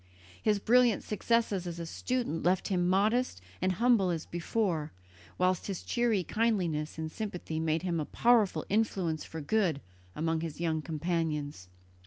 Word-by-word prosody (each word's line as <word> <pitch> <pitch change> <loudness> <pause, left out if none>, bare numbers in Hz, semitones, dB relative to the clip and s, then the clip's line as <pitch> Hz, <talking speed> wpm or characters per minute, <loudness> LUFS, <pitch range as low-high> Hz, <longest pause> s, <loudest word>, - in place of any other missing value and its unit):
His 210 -1 +2
brilliant 240 +1 +4
successes 210 -3 0
as 170 0 -5
a 170 - -4
student 235 -1 -2
left 185 +4 +1
him 180 -2 +1
modest 210 - +2 0.2
and 185 +1 +2
humble 230 -2 +3
as 165 -2 -2
before, 170 -3 -1 0.5
whilst 185 0 +1
his 195 -3 -4
cheery 235 -6 +1
kindliness 180 -10 0
and 160 0 -4
sympathy 180 -7 -4
made 160 +1 0
him 175 -3 0
a 150 - -1
powerful 230 -1 +3
influence 190 -7 0
for 160 - -7
good 170 -2 +1 0.4
amongst 160 +1 0
his 165 -2 -5
young 160 -2 0
companions. 155 - -2
180 Hz, 150 wpm, -30 LUFS, 160-215 Hz, 0.5 s, brilliant